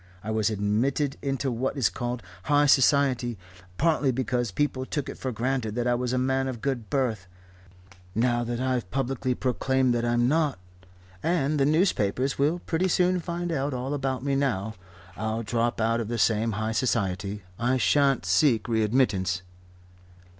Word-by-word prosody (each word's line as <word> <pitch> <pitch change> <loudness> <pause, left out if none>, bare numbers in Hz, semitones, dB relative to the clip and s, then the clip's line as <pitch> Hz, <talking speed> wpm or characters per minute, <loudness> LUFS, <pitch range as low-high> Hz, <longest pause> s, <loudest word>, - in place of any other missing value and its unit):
I 110 - -3
was 110 0 +1
admitted 115 +7 0
into 135 -1 -1
what 125 +4 -2
is 130 - +3
called 120 -2 -4 0.2
high 145 0 +4
society, 135 -4 +3 0.4
partly 155 -4 +2
because 125 -1 -1
people 130 +5 -1
took 140 +1 -3
it - - -6
for 130 - -3
granted 120 -2 -2
that 120 -1 -1
I 120 - +2
was 125 0 -1
a 130 - 0
man 130 +1 +1
of 130 -3 -4
good 120 -3 -3
birth. 115 -8 -1 0.9
Now 120 +1 +2
that 120 0 -3
I've 125 -6 -1
publicly 130 +1 -1
proclaimed 130 0 +1
that 120 0 0
I'm 120 0 +2
not 150 -5 +1 0.6
and 155 -3 +1
the 135 - +3
newspapers 135 - +1
will 150 +5 +2
pretty 175 +3 +1
soon 180 0 +2
find 175 0 -3
out 140 -3 -1
all 130 +3 -3
about 135 -2 -2
me 140 0 0
now 110 -7 0 0.4
I'll 110 +2 -2
drop 115 +2 -1
out 115 +1 +1
of 115 - -3
that 120 +1 -2
same 110 +2 +2
high 110 +1 -2
society. 100 -5 -1 0.2
I 125 +2 +2
shan't 135 -4 +2
seek 110 - +3
readmittance." 105 -6 +1
125 Hz, 165 wpm, -26 LUFS, 115-135 Hz, 0.9 s, high